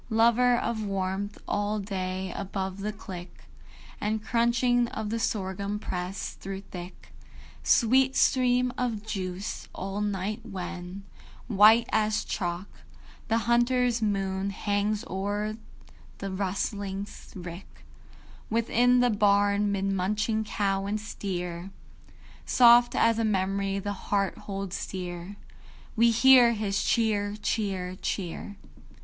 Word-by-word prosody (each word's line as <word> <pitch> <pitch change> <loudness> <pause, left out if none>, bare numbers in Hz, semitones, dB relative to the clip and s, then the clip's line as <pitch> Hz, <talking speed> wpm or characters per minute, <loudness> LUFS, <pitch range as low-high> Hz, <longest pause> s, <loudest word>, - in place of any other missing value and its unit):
Lover 235 +2 +4
of 225 -2 -2
warmth, 195 0 -2
all 205 +1 0
day 190 -2 -3
above 190 -1 -4
the 210 +2 -2
click 185 -4 -10 0.6
And 215 +1 -1
crunching 240 +1 +2
of 220 -2 -4
the 230 - -1
sorghum 200 -1 -2
press, 185 -2 -4
through 195 0 -7
thick 180 -2 -10 0.5
Sweet 260 +3 +4
steam 250 -1 +3
of 225 -4 -2
juice; 190 -2 -4
all 195 +2 -4
night 205 +2 -2
when, 185 -2 -6 0.4
white 220 +1 +6
as 215 0 +1
chalk, 175 0 -3 0.6
The 225 - +2
hunter's 240 0 +2
moon 195 -2 0
hangs 205 +1 -1
o'er 205 +3 -2 0.6
the 195 -1 -5
rustling 200 +1 -2 0.3
rick, 175 0 -10 0.6
Within 240 +2 +3
the 245 -1 +3
barn 205 0 +3
'mid 195 -1 -1
munching 210 +3 0
cow 195 -2 -1
and 210 +1 -1
steer, 180 -4 -5 0.7
Soft 240 0 +6
as 230 0 +3
a - - +1
memory 195 -1 0
the 205 +1 -3 0.2
heart 200 -2 +1
holds 195 -2 -5
dear, 180 +1 -6 0.6
We 235 +1 +5
hear 245 0 +7
his 205 -2 -1
"Cheer, 210 -3 +1
cheer, 190 -4 -2
cheer." 195 +2 -4
205 Hz, 115 wpm, -27 LUFS, 195-225 Hz, 0.7 s, hear